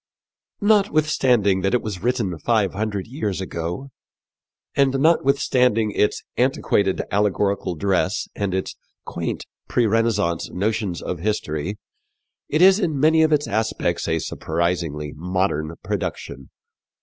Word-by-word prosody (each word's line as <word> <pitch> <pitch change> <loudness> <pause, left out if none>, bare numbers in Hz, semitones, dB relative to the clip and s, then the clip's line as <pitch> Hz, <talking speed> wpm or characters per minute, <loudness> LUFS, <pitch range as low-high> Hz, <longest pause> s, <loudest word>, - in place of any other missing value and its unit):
Notwithstanding 150 - +3
that 95 +5 +1
it 125 - 0
was 100 -5 -5
written 115 -6 0
five 110 -3 +1
hundred 100 -1 -2
years 110 - -3
ago, 90 +8 -5 0.8
and 135 -1 +2
notwithstanding 130 -7 +3
its 105 - 0
"antiquated 120 -6 +1
allegorical 100 -2 0
dress 95 +2 0
and 100 -2 -1
its 95 - -3 0.3
quaint - - -4 0.2
pre 120 - +2
Renaissance 105 -6 +1
notions 100 -2 -2
of 90 - -4
history," 95 -2 -2 0.7
it 155 +4 +3
is 190 +2 +7
in 160 -8 -1
many 160 +2 +4
of 160 0 +3
its 150 -1 +2
aspects 110 +2 -1
a - - +1
surprisingly 80 -3 -2
modern 90 -2 -1
production. 65 0 -4
105 Hz, 120 wpm, -22 LUFS, 90-130 Hz, 0.8 s, is